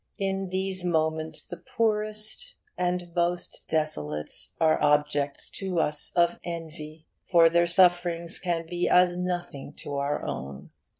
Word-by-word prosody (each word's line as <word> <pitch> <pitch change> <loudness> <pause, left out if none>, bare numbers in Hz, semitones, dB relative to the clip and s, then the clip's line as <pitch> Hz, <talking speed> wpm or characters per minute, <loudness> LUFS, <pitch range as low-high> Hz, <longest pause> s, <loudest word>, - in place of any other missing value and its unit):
In 195 -2 -2
these 190 0 0
moments 160 -2 0
the - - -7
poorest 215 - -1 0.2
and 180 -1 -2
most 175 0 -1
desolate 75 - -1 0.3
are 160 -1 +3
objects 145 -1 +1
to 190 -3 -3
us 150 -2 +2
of 170 -1 +3
envy, 160 -2 -7 0.2
for 165 -2 +6
their 170 +1 +3
sufferings 175 -1 +3
can 170 -3 -2
be 175 +1 -1
as 180 0 +5
nothing 175 -6 -4
to 145 -1 -6
our 140 +1 -1
own. 70 +1 -6
170 Hz, 130 wpm, -27 LUFS, 155-180 Hz, 0.3 s, for